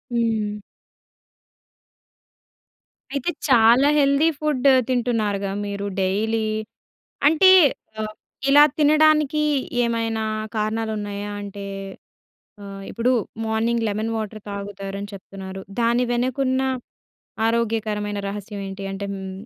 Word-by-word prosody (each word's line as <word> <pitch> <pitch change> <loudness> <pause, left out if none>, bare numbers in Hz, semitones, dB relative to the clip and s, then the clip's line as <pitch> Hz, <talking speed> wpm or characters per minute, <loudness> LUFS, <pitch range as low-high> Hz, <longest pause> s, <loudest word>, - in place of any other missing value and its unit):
హ్మ్. 220 -3 0 2.6
అయితే 280 +4 -1 0.2
చాలా 245 +1 +6
హెల్తీ 280 +2 +4
ఫుడ్ 295 -4 -1 0.2
తింటున్నారుగా 220 -6 0
మీరు 200 0 -4 0.2
డైలీ. 215 +4 0 0.9
అంటే 320 +5 +6 0.5
ఆహ్, 215 0 -4 0.4
ఇలా 290 +1 +8
తినడానికీ 305 0 +4 0.4
ఏమైనా 230 -1 -1 0.3
కారణాలున్నాయా? 210 -2 -2
అంటే 200 0 -7 1.0
ఆహ్, 195 0 -8
ఇప్పుడు 235 +2 +1 0.3
మార్నింగ్ 225 +1 0
లెమన్ 215 +2 -2
వాటర్ 215 0 -5
తాగుతారని 200 0 -6
చెప్తున్నారు. 190 0 -8 0.2
దాని 235 +1 +2
వెనకున్న 260 +2 0 0.9
ఆరోగ్యకరమైన 215 -3 -1
రహస్యం 205 0 -6
ఏంటి? 195 +1 -7
అంటే 200 +1 -5
హ్మ్. 190 -1 -6
220 Hz, 90 wpm, -22 LUFS, 200-245 Hz, 2.6 s, ఇలా